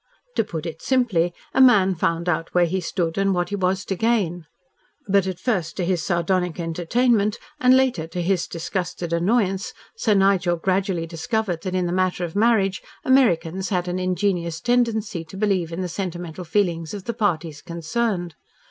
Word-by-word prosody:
To - - +3
put 165 -6 -6
it 160 -1 -6
simply, 225 -10 +2 0.2
a - - +4
man 205 -7 +6
found 165 0 -1
out 165 0 -1
where 175 -1 +5
he 185 +3 -1
stood 170 0 -2
and 195 -1 +2
what 175 0 -1
he 205 - -2
was 190 0 0
to 195 - -2
gain. 185 -7 0 0.6
But, 195 -1 +3
at 185 -2 -4
first 180 -10 -1
to 180 - 0
his 180 -2 0
sardonic 180 -1 0
entertainment 205 +6 +1 0.2
and 255 -1 +6
later 250 -12 +1
to 175 - -5
his 185 0 +1
disgusted 175 0 -4
annoyance, 195 +2 +1 0.2
Sir 220 - +2
Nigel 195 -3 +3
gradually 185 -1 0
discovered 175 +1 -2
that 185 0 -3
in 180 -1 +1
the 175 - -1
matter 185 -1 0
of 165 - -8
marriage, 205 -3 +2 0.2
Americans 190 -8 +2
had 180 -2 -1
an 180 +1 -2
ingenuous 180 -3 -1
tendency 220 -5 0
to 165 +4 -11
believe 190 -5 0
in 170 +3 -4
the 180 - -2
sentimental 175 -1 -5
feelings 170 -2 0
of 200 - -7
the 235 - -3
parties 165 -8 -1
concerned. 175 +1 -2
185 Hz, 175 wpm, -23 LUFS, 170-205 Hz, 0.6 s, man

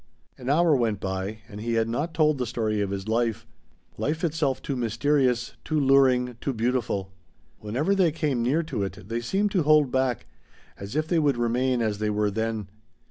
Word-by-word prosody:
An 125 0 -6
hour 160 +1 +4
went 115 -6 0
by 95 +3 -4
and 105 -1 -9
he 115 +1 -2
had 115 0 +2
not 145 +9 -2
told 155 -3 +3
the 125 - -1
story 110 -3 -1
of 100 - -1
his 100 +1 -4
life, 115 0 0 0.5
life 160 +4 -1
itself 150 -5 0
too 140 - -4
mysterious, 125 +1 +1
too 155 -1 0
luring, 130 -3 +3
too 135 - -1
beautiful. 115 -5 -1 0.5
Whenever 130 - 0
they 185 -4 +3
came 145 -6 -1
near 140 +8 +1
to 145 -10 -4
it 95 -1 -5
they 115 +1 -2
seemed 195 - 0
to 185 - +2
hold 150 -3 +4
back, 130 -2 0 0.5
as 100 +6 -8
if 155 +1 0
they 170 0 +2
would 145 -5 +2
remain 120 +1 +1
as 105 -2 -1
they 105 0 0
were 105 0 0
then. 110 -1 -2
125 Hz, 190 wpm, -26 LUFS, 110-145 Hz, 0.5 s, hour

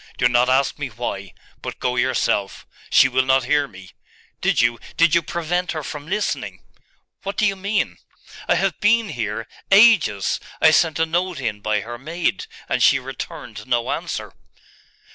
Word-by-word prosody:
Do 125 - +4
not 120 +1 +3
ask 130 +2 +2
me 145 - -2
why: 105 -5 -5 0.3
but - - -6
go 125 0 -1
yourself. 120 -5 0 0.2
She - - +6
will 130 0 +2
not 130 0 +3
hear 145 +3 +1
me. 95 -5 -14 0.5
Did - - +2
you 120 0 +2 0.2
did 165 -1 +4
you 170 - +5
prevent 170 +2 -2
her 155 -2 -4
from 145 +1 -7
listening?' 210 +4 -3 0.6
'What 195 +1 -5
do 215 - +3
you 200 -1 +1
mean?' 200 +2 -2 0.5
'I - - +5
have 195 -3 0
been 230 +1 +3
here 115 -4 -4 0.2
ages! 195 - +5 0.2
I - - +6
sent 160 -2 +3
a 160 - +2
note 175 0 -1
in 110 -5 -3
by 105 0 0
her 120 +2 -8
maid, 170 - -2 0.2
and - - -1
she - - +6
returned - - -8
no - - 0
answer. - - -4
145 Hz, 170 wpm, -21 LUFS, 120-180 Hz, 0.6 s, She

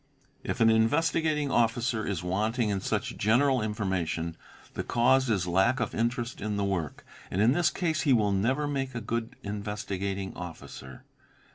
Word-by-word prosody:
If 120 - -3
an 115 0 +6
Investigating 150 +5 +2
Officer 115 -1 +1
is 95 -4 -2
wanting 110 +5 0
in 100 -2 -1
such - - -2
general 125 +5 +3
information, 95 -6 -2 0.4
the - - -3
cause 130 +2 +3
is 95 -6 +1
lack 95 +9 +2
of 115 - -2
interest 120 +1 -2
in 105 0 -2
the 100 - 0
work; 90 -7 -3 0.2
and 95 - -2
in 110 +4 +5
this 175 +5 +3
case 160 -4 -1
he 140 - +2
will 105 -5 +3
never 130 +10 +1
make 135 -3 -3
a - - -1
good 115 +1 -3
Investigating 100 -1 -4
Officer. 80 -6 -9
110 Hz, 160 wpm, -28 LUFS, 100-125 Hz, 0.4 s, an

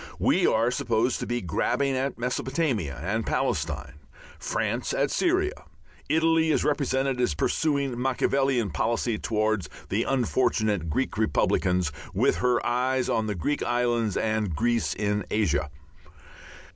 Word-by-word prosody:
We - - +3
are 115 +2 +2
supposed 120 0 0
to - - -4
be 120 0 -1
grabbing 125 - 0
at 135 0 -2
Mesopotamia 125 - -1
and - - -1
Palestine, 75 +3 -2 0.4
France 115 +3 -2
at 140 0 +1
Syria; 370 +2 0 0.4
Italy 160 0 +3
is - - +2
represented 135 -3 0
as 85 -12 +1
pursuing 140 - 0
a - - -5
Machiavellian 130 -2 +1
policy 115 +6 0
towards 110 -6 0 0.2
the 100 +4 +1
unfortunate 110 - +1
Greek 110 - -1
republicans, 90 -5 +1 0.2
with - - +2
her 125 +7 +1
eyes 125 +1 +1
on 110 -1 0
the 105 - -2
Greek 145 - -1
islands 120 -3 0
and 110 -6 0
Greece 120 +4 0
in 105 0 -1
Asia. 100 -8 +1
120 Hz, 130 wpm, -26 LUFS, 105-135 Hz, 0.4 s, We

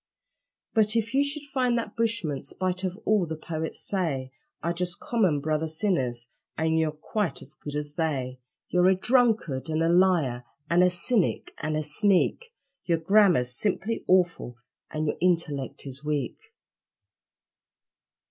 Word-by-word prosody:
But 215 -1 +3
if 230 +1 0
you 275 +1 +4
should 285 +1 -4
find 260 -4 0
that 225 -3 -4
bushmen 220 - -1
spite 185 0 -3
of 185 0 -2
all 205 -5 +2
the 160 - -4
poets 160 0 -5
say 145 -10 -1 0.3
Are 170 - 0
just 175 0 -3
common 190 -11 +1
brother 155 +2 -1
sinners, 130 - 0 0.3
and 160 0 +1
you're 160 -1 +1
quite 170 +5 -3
as 140 - -7
good 150 -1 -8
as 145 0 -3
they 135 -6 -2 0.3
You're 180 0 +3
a 190 - +4
drunkard, 220 - +1
and 160 +1 0
a 165 - +2
liar, 170 -9 +3 0.3
and 175 +1 +5
a 180 - +5
cynic, 180 +4 0
and 155 0 -1
a 155 - -1
sneak, 200 - +2 0.3
Your 170 -2 +1
grammar's 175 - +4
simply 205 - 0
awful 175 -9 +2 0.3
and 155 0 -2
your 150 - -1
intellect 165 -8 0
is 135 +1 -6
weak. 150 -5 -3
170 Hz, 150 wpm, -27 LUFS, 150-205 Hz, 0.3 s, and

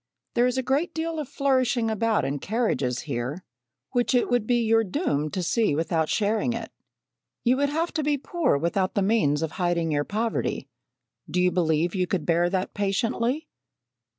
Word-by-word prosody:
There 240 +1 +3
is 250 +1 -1
a 260 - 0
great 285 +7 0
deal 325 0 -2
of 290 -4 -5
flourishing 255 -5 +1
about 220 0 +1
in 140 +1 -2
carriages 190 - -1
here, 140 +4 -4 0.5
which 245 +1 +1
it 245 - +2
would 240 -3 +1
be 240 -1 +2
your 225 0 +4
doom 180 - -1
to 185 +4 -3
see 210 -2 +1
without 160 0 0
sharing 220 +2 +1
it. 230 -1 -6 0.7
You 250 +1 +3
would 285 +1 +2
have 325 +4 -1
to 310 - -1
be 295 0 +1
poor 325 - 0
without 185 +5 0
the 200 - +2
means 175 -8 +2
of 160 - -2
hiding 170 -2 +1
your 145 -1 +1
poverty. 220 +6 -2 0.6
Do 180 - 0
you 180 0 +3
believe 165 -1 +1
you 185 -2 0
could 180 -4 -1
bear 170 +1 +2
that 190 0 -2
patiently? 230 +8 -1
215 Hz, 180 wpm, -25 LUFS, 170-250 Hz, 0.7 s, your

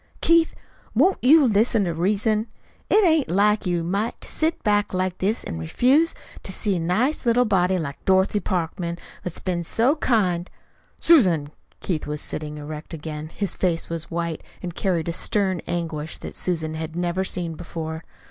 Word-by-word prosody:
"Keith, 335 -1 +3 0.4
won't 340 - +4
you 295 +3 +7
listen 220 -1 +3
to 175 -3 -1
reason? 210 +6 +1 0.4
It 425 -1 +5
ain't 320 -4 +3
like 205 +2 +2
you 175 -1 +1
a - - -4
mite 200 +7 -2
to - - -8
sit 320 +1 0
back 205 -2 +1
like 185 0 -1
this 210 +5 0
an' 80 - -5
refuse 260 - +3 0.3
to - - -3
see 195 0 0
a - - -2
nice 215 - +1
little 245 0 +3
body 190 -3 +2
like 140 -5 -5
Dorothy 190 +2 +3
Parkman, 170 -2 -2 0.2
what's 180 - -5
been 175 -2 -2
so 235 - +2
kind 185 -10 +1 0.3
" - - -37
"Susan!" 180 - +4 0.3
Keith 165 -5 -2
was 150 0 -3
sitting 150 0 -5
erect 150 +2 -7
again. 155 0 -6
His 200 -2 -1
face 170 -3 0
was 165 0 -4
white, 170 -1 -3 0.2
and 175 -1 -4
carried 175 -3 -1
a 170 - -1
stern 190 -1 0
anguish 160 -3 -3
that - - -8
Susan 160 -3 -1
had 160 0 -5
never 175 +1 0
seen 175 -3 -3
before. 160 0 -6
180 Hz, 175 wpm, -23 LUFS, 165-215 Hz, 0.4 s, you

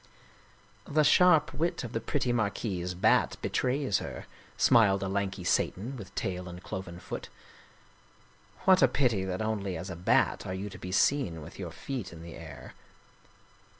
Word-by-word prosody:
" - - -30
The 150 +1 +2
sharp 180 0 +5
wit 170 -2 -1
of 120 - -6
the 115 - 0
pretty 125 0 0
Marquise 100 -5 -1
Bat 90 - +3
betrays 130 -5 +1
her," - - -7 0.3
smiled 100 -4 +5
a - - -1
lanky 95 -1 -2
Satan 105 +8 0
with 100 -7 -10
tail 90 -1 -3
and 90 +1 -10
cloven 90 -2 -6
foot. - - -7 0.7
" - - -27
What 190 -1 +6
a 135 - +7
pity 120 -6 +1
that 95 +3 -2
only 100 -4 -2
as 95 +4 -6
a - - -5
Bat 85 +2 +2
are 95 - -3
you 100 +2 -5
to - - -10
be 90 - -6
seen 95 - +2
with - - -12
your - - -4
feet 125 -9 -5
in 85 -1 -10
the 85 -1 -9
air." - - -10
100 Hz, 175 wpm, -29 LUFS, 90-125 Hz, 0.7 s, a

